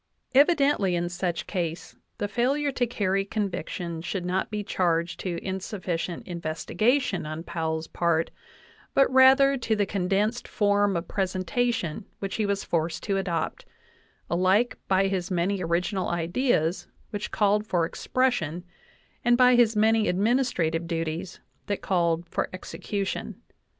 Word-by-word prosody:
Evidently 280 - +4
in 175 0 0
such 175 -1 -2
case 170 -3 -4 0.2
the 205 - -1
failure 275 +7 +1
to 245 -2 0
carry 195 -4 0
conviction 180 -5 -3
should 180 +1 -3
not 185 +1 -1
be 210 -1 -3
charged 170 -3 0
to 175 -3 -3
insufficient 185 -3 -3
investigation 175 - 0
on 155 +1 -5
Powell's 160 -2 -2
part, 165 -1 0 0.6
but 275 -1 +4
rather 270 +1 +6
to 230 -3 0
the 205 -1 +1
condensed 200 +5 0
form 205 -2 +2
of 170 - -4
presentation 195 0 -1
which 195 -1 -4
he 215 -2 0
was 200 0 -1
forced 165 0 -1
to 195 -2 0
adopt, 170 -4 -2 0.6
alike 185 +7 +2
by 190 0 +3
his 190 -2 -1
many 185 +2 0
original 180 +3 0
ideas 170 - 0 0.2
which 205 -1 -4
called 210 0 +2
for 175 -4 +1
expression, 180 - -1 0.6
and 240 0 +4
by 250 0 +6
his 235 -2 +4
many 220 0 +3
administrative 185 -6 +1
duties 165 +2 -3 0.3
that 205 - -2
called 170 -2 +1
for - - -2
execution. 195 +1 -4
190 Hz, 135 wpm, -26 LUFS, 170-220 Hz, 0.6 s, rather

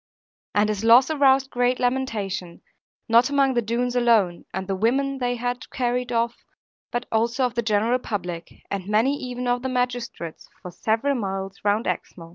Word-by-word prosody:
And 205 +1 +3
his 210 0 -2
loss 240 +6 +6
aroused 270 -2 +3
great 245 +1 +1
lamentation, 215 -9 -2 0.4
not 235 +2 +5
among 275 -2 +3
the 240 - +2
Doones 240 +2 -1
alone, 225 -8 +2
and 190 0 -4
the 195 - -1
women 270 +7 0
they 245 -1 0
had 245 +1 -4
carried 250 -1 -1
off, 235 0 -1 0.5
but 240 0 -3
also 235 +3 +1
of 245 - -2
the 235 - 0
general 225 +2 +1
public, 180 -8 -5 0.2
and 195 -2 -3
many 225 +7 +2
even 250 -1 -5
of 245 0 +1
the 260 - -3
magistrates, 245 -9 -3
for 180 - -7
several 225 +9 0
miles 195 -4 -4
round 210 +3 +1
Exmoor. 165 -2 -4
235 Hz, 170 wpm, -24 LUFS, 205-250 Hz, 0.5 s, loss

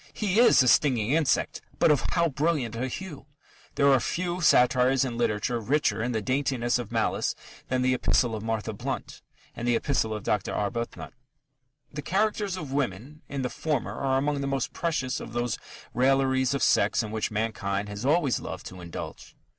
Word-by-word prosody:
He 210 0 0
is 240 - +7
a - - +1
stinging 125 -4 +3
insect, 155 -2 +1 0.2
but - - +4
of 145 - +3
how 170 -1 +2
brilliant 145 -5 -1
a 125 +3 -2
hue! 150 0 -7 0.5
There 140 -1 +5
are 135 - +5
few 175 +7 -2
satires 130 -2 +4
in 120 -2 -4
literature 120 +1 0
richer 130 +1 +1
in 120 +2 -1
the 110 -3 -2
daintiness 130 -1 0
of 120 - -6
malice - - 0 0.3
than 125 0 0
the 130 0 +3
Epistle 120 -2 +1
to - - -9
Martha 110 -1 -2
Blount 100 - -5 0.3
and 120 0 -4
the 120 - +3
Epistle 115 -4 0
to - - -3
Dr. 105 -2 -1
Arbuthnot. 115 +3 -3 0.8
The 150 - -4
"characters" 200 +2 0
of 150 -6 -6
women 135 +3 -3
in 140 -1 -3
the 125 - -1
former 155 -3 -2
are 135 -1 0
among 145 +1 0
the 140 - -2
most 135 -2 -2
precious 155 -6 -1
of 110 - -9
those 120 -2 -1 0.3
railleries 130 +1 +2
of 140 - -1
sex - - +3
in 105 - -6
which 110 0 -1
mankind 105 -2 -2
has 100 +2 -6
always 145 -2 +2
loved - - -7
to 90 0 -11
indulge. 85 -1 -8
130 Hz, 185 wpm, -27 LUFS, 115-145 Hz, 0.8 s, is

